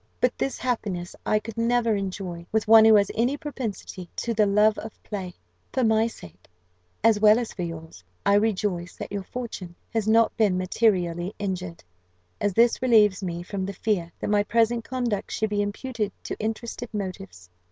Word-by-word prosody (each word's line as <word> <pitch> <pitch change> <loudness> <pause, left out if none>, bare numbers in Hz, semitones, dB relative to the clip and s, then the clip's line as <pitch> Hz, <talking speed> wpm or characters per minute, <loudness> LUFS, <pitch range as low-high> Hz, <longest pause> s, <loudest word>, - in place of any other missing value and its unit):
But 250 - +2
this 270 - -2
happiness 200 -8 -3
I 215 - +3
could 220 +1 -6
never 230 -1 +2
enjoy 185 -3 -5
with 220 0 0
one 220 0 +8
who 220 -1 +8
has 200 -1 +3
any 245 +6 +1
propensity 225 - -6
to 235 - -2
the 215 -2 +3
love 210 +2 +3
of 220 - -7
play. 190 -4 -6 0.4
"For 260 - 0
my 220 -1 +4
own 230 - +1
sake, 90 - -14 0.6
as 225 -2 +5
well 215 +1 +6
as 240 -2 -3
for 185 - -6
yours, 160 - -7 0.2
I 200 - +4
rejoice 200 -4 0
that - - -7
your 200 -1 -2
fortune 190 -5 -7 0.2
has 220 -2 0
not 225 +1 +4
been 205 -5 +3
materially 185 -2 0
injured; 185 -4 -4 0.6
as 205 - 0
this 235 +1 +4
relieves 210 -6 +4
me 175 -2 -4
from 190 +1 -4
the 200 +1 -4
fear 185 -4 -1
that - - -2
my 205 -1 +4
present 230 +2 +1
conduct 240 -5 -2
should 220 -1 -1
be 205 0 +1
imputed 210 +1 -3
to - - -4
interested 225 +2 -4
motives. 185 - -6
210 Hz, 185 wpm, -25 LUFS, 185-225 Hz, 0.6 s, one